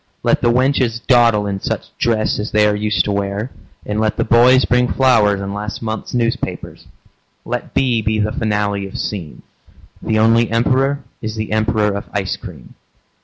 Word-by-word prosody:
Let - - +2
the 120 - +3
wenches 125 -2 +1
dawdle 115 -5 +4
in 100 -1 -3
such - - -5
dress 110 -2 0
As 105 - -4
they 105 0 +3
are 105 0 +2
used 105 +1 0
to 105 - -1
wear, 100 +4 -2 0.3
and 105 +1 -2
let 110 -1 0
the - - +1
boys 125 +3 +5
Bring 125 0 +2
flowers 115 -7 +3
in 100 0 -5
last 105 +2 -5
month's 110 +2 -4
newspapers. 115 -1 -3 0.6
Let - - -5
be 125 -4 +2
be 110 +1 0
the 105 0 0
finale 105 -2 -1
of 95 - -8
seem. 90 -8 -5 0.6
The 110 - 0
only 115 +1 +3
emperor 135 +4 +1 0.2
is 110 -1 -4
the 110 -1 -4
emperor 110 -1 +1
of 100 - -5
ice 100 -2 -1
cream. 85 - -12
110 Hz, 175 wpm, -18 LUFS, 105-120 Hz, 0.6 s, boys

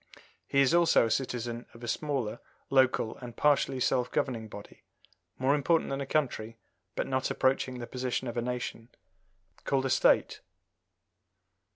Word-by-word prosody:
He 140 - +3
is 140 +3 +3
also 170 -7 +5
a 115 - -2
citizen 120 -2 -2
of 115 - -13
a - - -5
smaller 130 -3 -2 0.3
local 130 -4 +3
and 120 -2 -9
partially 140 -2 +2
self 125 0 +1
governing 115 -5 -2
body 100 -1 -11 0.6
more 130 +2 +2
important 150 +2 +1
than 135 0 -2
a 135 - -4
county, 115 -7 -1 0.4
but - - -1
not 130 -1 -1
approaching 130 -1 +1
the 120 - -5
position 125 +1 -3
of 120 - -4
a 120 - 0
nation 120 -1 -4 0.7
called 135 -1 0
a 135 - 0
State. - - +3
130 Hz, 155 wpm, -29 LUFS, 120-135 Hz, 0.7 s, also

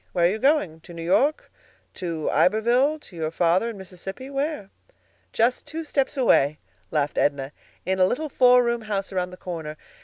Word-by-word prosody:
Where 175 -2 +3
are - - +5
you 215 - -3
going? 255 - +2
to 170 +1 -13
New 165 - -6
York? 275 - +1 0.4
to 165 -4 -4
Iberville? 240 +9 +3
to 185 - -14
your 160 -2 -2
father 175 +6 +2
in 225 - -7
Mississippi? 190 +7 -8
where?" 275 -7 -3 0.6
"Just 235 +3 +1
two 325 +1 -5
steps 280 -3 -1
away," 155 - +3 0.3
laughed 145 +3 0
Edna, 140 -1 0 0.3
"in 190 +1 0
a 185 - +5
little 310 +10 -2
four 250 -3 +5
room 235 -1 0
house 200 -2 -3
around 180 -1 -1
the 180 - -11
corner. 160 -4 -6
195 Hz, 180 wpm, -24 LUFS, 170-250 Hz, 0.6 s, are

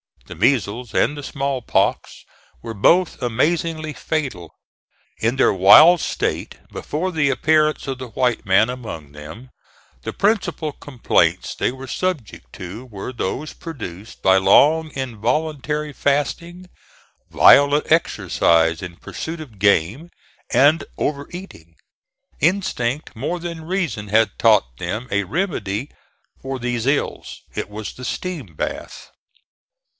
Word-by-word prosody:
The - - -9
measles 115 - 0
and 150 - +2
the - - -5
small 140 -2 -3
pox - - -1 0.4
were 115 -1 -5
both 165 - +2
amazingly 155 +6 -1
fatal. 125 - -4 0.6
In 115 +3 +1
their 135 - +3
wild 125 - +8
state, - - -3
before 175 +5 -3
the 150 -4 +1
appearance 155 +2 +2
of 135 -1 -4
the 130 - -6
white 120 +1 -1
man 100 +4 +4
among 110 - -7
them, 80 - -11 0.5
the - - -5
principal 200 -7 0
complaints 135 -4 0
they - - -1
were 130 +1 -9
subject 135 - -4
to 95 +8 -8
were 105 -1 -7
those 130 +7 -4
produced 110 - -9
by 95 0 +5
long 150 +12 +4
involuntary 150 +4 -2
fasting, 170 +7 -2 0.6
violent 145 +2 +5
exercise 85 - +2
in 90 -2 -7
pursuit 160 - -7
of 115 -10 -12
game, 100 - +2 0.4
and 145 +6 +4
over 140 -1 -2
eating. 175 - -11 0.6
Instinct 150 -6 -1
more 145 +10 -3
than 170 -2 -7
reason 170 - -2
had 110 0 +2
taught - - +3
them 110 - -4
a 100 -1 0
remedy 115 - -3 0.5
for 135 0 -4
these 120 -1 -2
ills. 140 +1 -2
It - - -4
was 105 0 -7
the 125 - -9
steam 145 - -5
bath. - - -6
130 Hz, 125 wpm, -21 LUFS, 105-155 Hz, 0.6 s, wild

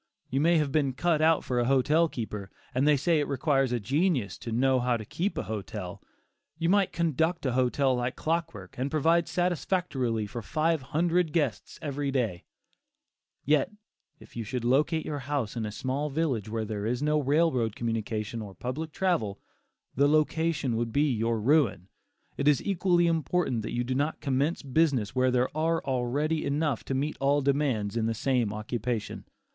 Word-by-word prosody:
You 135 +2 +1
may 170 +2 +4
have 150 -3 0
been 140 -3 +1
cut 155 +4 +1
out 160 0 +4
for 125 -1 -1
a 120 - +1
hotel 145 +6 +3
keeper, 105 -6 -5 0.2
and 130 +3 +2
they 150 -1 +5
say 160 +3 +2
it 145 - -1
requires 135 -1 +1
a 120 - 0
genius 135 - 0
to 115 - -6
"know 130 +3 +3
how 125 -1 +1
to 110 - -8
keep 185 - -2
a - - -1
hotel." 105 -3 -6 0.6
You 165 0 0
might 200 0 +3
conduct 165 0 0
a 130 - +1
hotel 130 +1 +2
like 125 0 -2
clockwork, 160 - -3
and 135 +2 -1
provide 165 +3 +2
satisfactorily 170 - -1
for 115 +3 -6
five 155 +6 0
hundred 165 +4 +1
guests 145 -8 -1
every 145 -1 -2
day; 115 -10 -1 1.0
yet, 150 +5 +2 0.5
if - - -16
you 115 - -3
should 120 +2 -4
locate 150 +6 +2
your 145 -1 -3
house 135 -5 -2
in 110 -2 -2
a - - -5
small 135 +6 -2
village 135 -8 -1
where 110 0 -2
there 105 -1 -3
is 125 +4 -1
no 150 0 +2
railroad 135 -6 +1
communication 115 -1 -3
or 100 -3 -9
public 150 +6 -4
travel, 120 - 0 0.6
the 140 +2 +4
location 155 -4 +1
would 115 0 -1
be 145 +2 +2
your 115 0 0
ruin. 115 - +2 0.5
It 140 - 0
is 145 -4 +4
equally 180 -3 +2
important 165 -6 0
that 115 - -5
you 120 - 0
do 125 +1 -2
not 145 +4 -1
commence 140 +3 0
business 135 -6 +1
where 130 0 +2
there 125 +2 0
are 165 +1 +1
already 140 +5 0
enough 145 -3 0
to 135 - -2
meet 145 +3 -1
all 140 +1 +3
demands 135 -7 0
in 115 -1 0
the 115 - -1
same 125 -3 +1
occupation. 110 +1 -4
135 Hz, 180 wpm, -28 LUFS, 120-155 Hz, 1.0 s, they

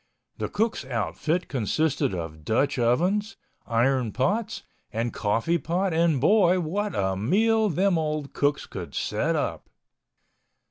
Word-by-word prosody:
The - - -2
cook's 220 -7 -1
outfit 135 - -2
consisted 135 -2 0
of 80 -3 -6
Dutch 135 - +1
ovens, 180 - +1 0.3
iron 120 0 +1
pots 210 - -1 0.3
and 115 +2 -2
coffee 115 +11 0
pot 175 +5 -1
and 165 -3 +2
boy, 185 - +4
what 200 +5 -2
a 95 -1 0
meal 215 - +2
them 180 0 +2
old 150 -2 -3
cooks 145 0 0
could - - -8
set - - 0
up! - - -3
155 Hz, 130 wpm, -26 LUFS, 120-185 Hz, 0.3 s, boy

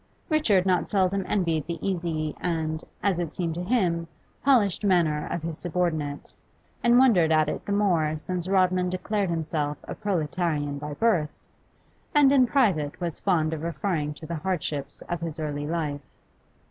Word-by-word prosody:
Richard 220 - +3
not 185 -2 +1
seldom 195 -1 +1
envied 165 -7 0
the 170 -1 -3
easy 165 -5 -2
and, 160 -2 -2 0.2
as 195 -4 +2
it 170 -3 -2
seemed 170 -3 -2
to 175 +2 -4
him, 180 -6 +1 0.4
polished 230 -9 +3
manner 170 -6 +2
of 170 - -3
his 165 -1 -4
subordinate, 160 -5 -2 0.5
and 240 0 +5
wondered 205 -11 +5
at 155 -1 +4
it - - -3
the - - -2
more 170 -7 +2
since 180 +2 -3
Rodman 185 -1 +2
declared 190 +2 -1
himself 155 -3 -2
a - - -6
proletarian 155 -5 -1
by 150 0 -5
birth, 175 -7 +2 0.9
and, 285 -2 +6
in 260 -3 +5
private, 190 - +1
was 170 -3 -3
fond 160 -5 +1
of 155 - -4
referring 160 -2 -2
to 160 - -10
the 170 +1 -4
hardships 150 -5 -3
of 175 -1 -4
his 165 -2 -4
early 145 -1 -3
life. 150 -3 -2
170 Hz, 160 wpm, -26 LUFS, 155-190 Hz, 0.9 s, and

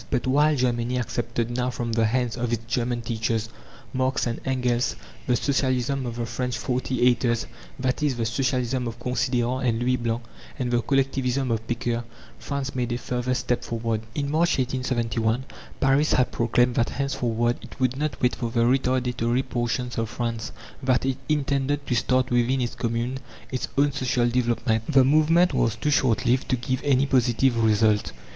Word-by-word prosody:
But 125 - 0
while 145 +4 +3
Germany 125 -1 0
accepted 120 0 -2
now 125 0 0
from 120 -2 -3
the 115 -1 +2
hands 125 0 0
of 120 -1 -2
its 115 -1 -2
German 120 0 -1
teachers, 110 -1 -1 0.4
Marx 130 0 0
and 120 -1 -3
Engels, 125 -2 0 0.3
the 125 - +3
Socialism 130 -1 0
of 115 - -5
the 120 -1 -2
French 125 0 -3
"forty 125 +2 -1
eighters" 120 -1 +2 0.3
that 130 +1 -1
is, 145 -4 +1
the 115 - -1
Socialism 125 +1 0
of 115 0 -5
Considérant 125 +1 0
and 115 - 0
Louis 125 +1 +1
Blanc, 120 0 -2 0.3
and 125 -3 -2
the 120 -1 +2
Collectivism 135 -1 0
of 115 -1 -2
Pecqueur, 120 0 -1 0.4
France 140 -1 -3
made 125 -2 -2
a - - -1
further 125 0 -2
step 125 -1 -1
forward. 115 -2 -2
In 140 -1 -1
March, 170 +3 +2
1871, 125 -2 0 0.3
Paris 135 +3 +3
had 125 - +2
proclaimed 120 +1 +2
that 120 0 +1
henceforward 120 -4 -1
it - - -12
would 130 -1 +1
not 145 -3 -2
wait 125 - +4
for 120 - -3
the 115 0 0
retardatory 125 -1 +1
portions 120 0 -2
of 115 -1 -1
France: 115 0 -3 0.3
that 130 -1 +1
it 135 0 -1
intended 140 -1 0
to - - -1
start 125 +2 +1
within 120 +2 +2
its 120 -2 -1
Commune 120 +2 -2 0.3
its 130 - -2
own 145 +1 +4
social 125 -3 +1
development. 120 -2 +1
The 135 -3 +6
movement 155 +6 +4
was 115 -1 +1
too 150 +6 -1
short 130 -5 +2
lived 125 +2 +1
to 130 - +3
give 130 +2 -2
any 140 -1 +3
positive 125 -2 +2
result. 110 -1 +3
125 Hz, 175 wpm, -25 LUFS, 120-130 Hz, 0.4 s, The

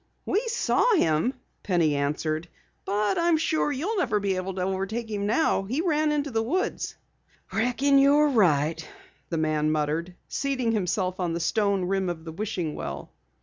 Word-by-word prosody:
"We 405 - +2
saw 475 0 +2
him," 165 - +2 0.3
Penny 170 -6 +2
answered, 155 +3 -1 0.4
"but 205 0 0
I'm 340 -1 +3
sure 315 -1 +1
you'll 340 +11 -2
never 255 - +1
overtake 190 +3 -2
him 205 -1 -2
now. 235 0 +2
He 250 +9 -2
ran 310 -3 +1
into 290 -1 -1
the 225 -1 +1
woods." 310 +12 -2 0.6
"Reckon 260 +5 +3
you're 290 +2 +5
right," 165 - +2 0.5
the 165 - -2
man 155 -1 +1
muttered, 155 +4 -1
seating 260 -4 -1
himself 185 -2 -1
on 175 -2 -1
the 170 - -2
stone 200 +1 +1
rim 190 0 0
of 165 -2 -5
the 160 - -6
wishing 175 -3 -3
well. 75 +2 -6
200 Hz, 150 wpm, -26 LUFS, 170-275 Hz, 0.6 s, you're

